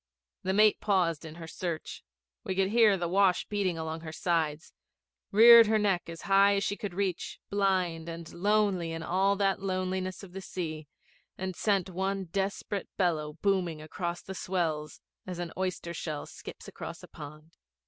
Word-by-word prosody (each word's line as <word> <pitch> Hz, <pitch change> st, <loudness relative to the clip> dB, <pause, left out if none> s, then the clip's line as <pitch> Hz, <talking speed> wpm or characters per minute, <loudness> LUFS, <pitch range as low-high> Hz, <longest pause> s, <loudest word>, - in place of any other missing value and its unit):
The 190 Hz, 0 st, -1 dB
mate 215 Hz, +1 st, +4 dB
paused 175 Hz, -7 st, +1 dB
in 160 Hz, 0 st, -9 dB
her 165 Hz, -1 st, -8 dB
search; 165 Hz, 0 st, -5 dB, 0.4 s
we 190 Hz, -, -3 dB
could 190 Hz, 0 st, +2 dB
hear 220 Hz, -2 st, +5 dB
the 175 Hz, -1 st, -2 dB
wash 190 Hz, 0 st, +3 dB
beating 195 Hz, -5 st, -1 dB
along 160 Hz, 0 st, -4 dB
her 160 Hz, -1 st, -7 dB
sides; 160 Hz, -2 st, -1 dB, 0.6 s
reared 230 Hz, +2 st, +9 dB
her 220 Hz, 0 st, +3 dB
neck 195 Hz, -5 st, +1 dB
as 165 Hz, 0 st, -8 dB
high 200 Hz, +1 st, +5 dB
as 200 Hz, -, 0 dB
she 205 Hz, -, -1 dB
could 205 Hz, -5 st, -6 dB
reach, 190 Hz, -3 st, -2 dB
blind 185 Hz, -5 st, 0 dB
and 165 Hz, 0 st, -8 dB
lonely 195 Hz, -3 st, +1 dB
in 165 Hz, 0 st, -5 dB
all 190 Hz, +4 st, +2 dB
that 195 Hz, -1 st, +1 dB
loneliness 185 Hz, 0 st, -2 dB
of 185 Hz, -2 st, -11 dB
the 195 Hz, -, -6 dB
sea, 155 Hz, -5 st, -5 dB, 0.5 s
and 185 Hz, -1 st, -4 dB
sent 200 Hz, -2 st, +1 dB
one 190 Hz, +1 st, -2 dB
desperate 195 Hz, +2 st, -3 dB
bellow 155 Hz, -5 st, 0 dB
booming 185 Hz, -5 st, +1 dB
across 170 Hz, +3 st, -4 dB
the 190 Hz, -, -7 dB
swells 165 Hz, -5 st, -2 dB, 0.3 s
as 180 Hz, -1 st, -5 dB
an 175 Hz, -1 st, -4 dB
oyster 185 Hz, -2 st, -3 dB
shell 155 Hz, -3 st, -4 dB
skips -, -, -10 dB
across -, -, -8 dB
a -, -, -10 dB
pond. 155 Hz, +2 st, -11 dB
185 Hz, 170 wpm, -29 LUFS, 165-195 Hz, 0.6 s, reared